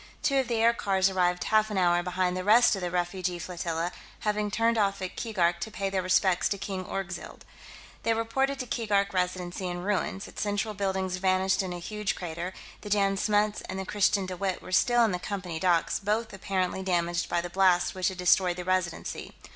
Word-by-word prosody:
Two 275 - +2
of 260 - 0
the 235 - -1
aircars 200 -4 +2
arrived 180 -1 +1
half 215 0 +3
an 210 - -3
hour 175 -1 +3
behind 180 0 -1
the 185 - -3
rest 220 +3 +6
of 195 - -5
the 180 - -2
refugee 180 0 -2
flotilla, 170 -1 -3 0.3
having 210 0 0
turned 230 +2 +2
off 200 -3 +1
at 185 -1 -5
Keegark 180 -7 0
to 220 - -4
pay 195 -2 -3
their 190 -1 0
respects 185 0 +2
to 200 - -1
King 190 -1 -4
Orgzild. 190 -2 -6 0.6
They 230 0 +1
reported 270 +5 0
the 255 - -4
Keegark 205 -4 0
Residency 180 0 -2
in 175 0 -4
ruins, 195 0 -1
its - - -7
central 205 +1 -1
buildings 190 -2 -1
vanished 190 +1 +2
in 185 -2 -4
a 175 - -4
huge 210 +4 -3
crater; 175 +1 -5 0.3
the 210 - -8
Jan 200 -1 +2
Smuts 210 +1 +1
and 190 - -4
the 190 - -4
Christiaan 200 -1 +2
De 185 0 -5
Wett 190 -1 -2
were - - -11
still 240 +5 +4
in 220 - 0
the 180 - -2
Company 180 -4 -4
docks, 175 -2 +2
both 215 +3 -1
apparently 190 -1 -2
damaged 175 -2 0
by 175 - +1
the 175 0 -5
blast 185 -1 +3
which 185 -1 0
had 190 - -2
destroyed 180 0 +3
the 180 - -5
Residency. 185 -2 -2
190 Hz, 205 wpm, -28 LUFS, 180-210 Hz, 0.6 s, rest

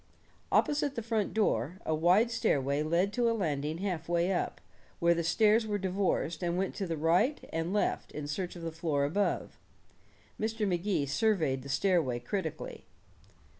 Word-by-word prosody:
Opposite 290 -1 +2
the 230 - -3
front 220 -3 0
door, 175 - 0
a 160 - 0
wide 180 +9 +4
stairway 140 - +1
led 170 +6 +1
to 240 -2 +2
a 230 - 0
landing 155 -4 -1
half 175 -4 -3
way 175 +2 +2
up, 175 - -2 0.4
where 170 0 +4
the 170 0 -1
stairs 220 +5 +3
were 205 -1 0
divorced 190 -3 -1
and 175 0 -1
went 190 +1 -1
to 195 - -2
the 165 -1 -2
right 175 - +2
and 165 +2 -1
left 210 - 0
in 150 - -5
search 175 +5 -3
of 170 - -8
the 165 - -3
floor 155 -3 0
above. 200 +8 -1 0.8
Mr. 220 -1 -1
Magee 180 -3 0
surveyed 145 -3 +1
the 140 - -10
stairway 150 -4 +2
critically. 205 - -5
175 Hz, 170 wpm, -31 LUFS, 155-210 Hz, 0.8 s, wide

